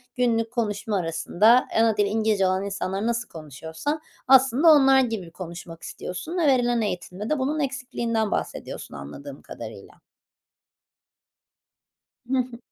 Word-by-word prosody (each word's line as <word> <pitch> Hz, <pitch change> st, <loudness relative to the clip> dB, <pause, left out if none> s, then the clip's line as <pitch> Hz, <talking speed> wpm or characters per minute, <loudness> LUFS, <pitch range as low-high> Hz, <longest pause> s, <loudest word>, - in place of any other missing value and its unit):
günlük 230 Hz, -2 st, +1 dB
konuşma 215 Hz, -3 st, -1 dB
arasında 180 Hz, +8 st, +3 dB
ana 225 Hz, -2 st, +3 dB
dili 205 Hz, -1 st, +3 dB
İngilizce 215 Hz, -2 st, +1 dB
olan 190 Hz, +1 st, 0 dB
insanlar 195 Hz, +1 st, -3 dB
nasıl 235 Hz, 0 st, -1 dB
konuşuyorsa 160 Hz, -, -5 dB, 0.3 s
aslında 265 Hz, +3 st, +5 dB
onlar 270 Hz, -3 st, +7 dB
gibi 220 Hz, -9 st, -2 dB
konuşmak 170 Hz, -2 st, -9 dB
istiyorsun 315 Hz, -, -6 dB
ve 325 Hz, -4 st, +2 dB
verilen 245 Hz, -3 st, +3 dB
eğitimde 190 Hz, +1 st, -4 dB
de 305 Hz, -3 st, 0 dB
bunun 295 Hz, +4 st, -1 dB
eksikliğinden 240 Hz, -5 st, -2 dB
bahsediyorsun -, -, -4 dB
anladığım 135 Hz, -, -9 dB
kadarıyla. -, -, -10 dB, 2.4 s
Hı 265 Hz, -, +2 dB
hı. 245 Hz, -1 st, -3 dB
225 Hz, 125 wpm, -24 LUFS, 185-255 Hz, 2.4 s, onlar